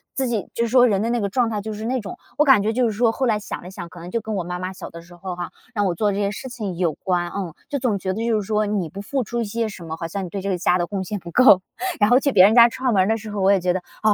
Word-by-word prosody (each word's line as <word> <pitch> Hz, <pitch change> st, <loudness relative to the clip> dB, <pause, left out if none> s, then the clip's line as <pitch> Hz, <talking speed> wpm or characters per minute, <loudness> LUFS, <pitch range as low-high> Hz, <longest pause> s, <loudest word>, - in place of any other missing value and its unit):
自 265 Hz, -1 st, 0 dB
己 225 Hz, -4 st, -2 dB
就 235 Hz, -, 0 dB
是 -, -, -3 dB
说 250 Hz, +1 st, +6 dB
人 200 Hz, -3 st, +1 dB
的 230 Hz, -, -1 dB
那 240 Hz, -, 0 dB
个 200 Hz, -, 0 dB
状 240 Hz, +2 st, +1 dB
态 210 Hz, -2 st, -2 dB
就 220 Hz, +1 st, -5 dB
是 215 Hz, +1 st, -6 dB
那 255 Hz, +2 st, 0 dB
种。 200 Hz, -3 st, -8 dB, 0.2 s
我 300 Hz, -, +4 dB
感 265 Hz, -7 st, +6 dB
觉 220 Hz, -, +1 dB
就 250 Hz, +1 st, +2 dB
是 225 Hz, -, +1 dB
说 230 Hz, +2 st, +2 dB
后 260 Hz, +3 st, -1 dB
来 220 Hz, -4 st, +1 dB
想 210 Hz, -, -6 dB
了 180 Hz, -, -9 dB
想， 175 Hz, -2 st, -8 dB
可 175 Hz, -, -12 dB
能 175 Hz, +1 st, -8 dB
就 230 Hz, -, -1 dB
跟 220 Hz, 0 st, -4 dB
我 185 Hz, -, -1 dB
妈 180 Hz, +1 st, -5 dB
妈 185 Hz, +1 st, -4 dB
小 -, -, -8 dB
的 170 Hz, -, -10 dB
时 175 Hz, +1 st, -16 dB
候 180 Hz, +1 st, -6 dB
哈， 175 Hz, 0 st, -5 dB, 0.2 s
让 205 Hz, -3 st, 0 dB
我 180 Hz, -3 st, 0 dB
做 205 Hz, +4 st, +1 dB
这 195 Hz, -, -3 dB
些 200 Hz, 0 st, 0 dB
事 235 Hz, -, -7 dB
情 205 Hz, -8 st, -5 dB
有 170 Hz, -4 st, +1 dB
关， 175 Hz, -2 st, -1 dB
嗯， 185 Hz, -5 st, -4 dB, 0.2 s
就 285 Hz, -, -2 dB
总 240 Hz, -5 st, 0 dB
觉 185 Hz, 0 st, -2 dB
得 225 Hz, +4 st, -3 dB
就 225 Hz, -2 st, +2 dB
是 -, -, -8 dB
说 215 Hz, -1 st, +1 dB
你 200 Hz, -5 st, -1 dB
不 195 Hz, +6 st, -8 dB
付 260 Hz, +6 st, -2 dB
出 235 Hz, +2 st, -3 dB
一 -, -, -1 dB
些 225 Hz, +2 st, -2 dB
什 185 Hz, -5 st, -10 dB
么， 160 Hz, 0 st, -5 dB
好 165 Hz, -, -4 dB
像 195 Hz, +3 st, -4 dB
你 -, -, -8 dB
对 200 Hz, -, -4 dB
这 200 Hz, -, -3 dB
个 185 Hz, -, 0 dB
家 180 Hz, 0 st, +2 dB
的 175 Hz, -, 0 dB
贡 195 Hz, -2 st, -3 dB
献 205 Hz, +2 st, -4 dB
不 170 Hz, -1 st, -10 dB
够。 205 Hz, -4 st, +6 dB, 0.4 s
然 210 Hz, +1 st, +4 dB
后 250 Hz, +2 st, +6 dB
去 280 Hz, -, +1 dB
别 185 Hz, -6 st, +7 dB
人 215 Hz, -, +4 dB
家 235 Hz, -1 st, +8 dB
串 255 Hz, +1 st, -1 dB
门 190 Hz, -2 st, +4 dB
儿 190 Hz, -, 0 dB
的 225 Hz, -, +2 dB
时 215 Hz, -1 st, -8 dB
候， 205 Hz, -1 st, -3 dB
我 195 Hz, +1 st, +4 dB
也 195 Hz, -, +4 dB
觉 180 Hz, 0 st, +1 dB
得， 185 Hz, -, -2 dB, 0.2 s
哦， 215 Hz, -1 st, +5 dB
205 Hz, 390 characters per minute, -22 LUFS, 185-230 Hz, 0.4 s, 家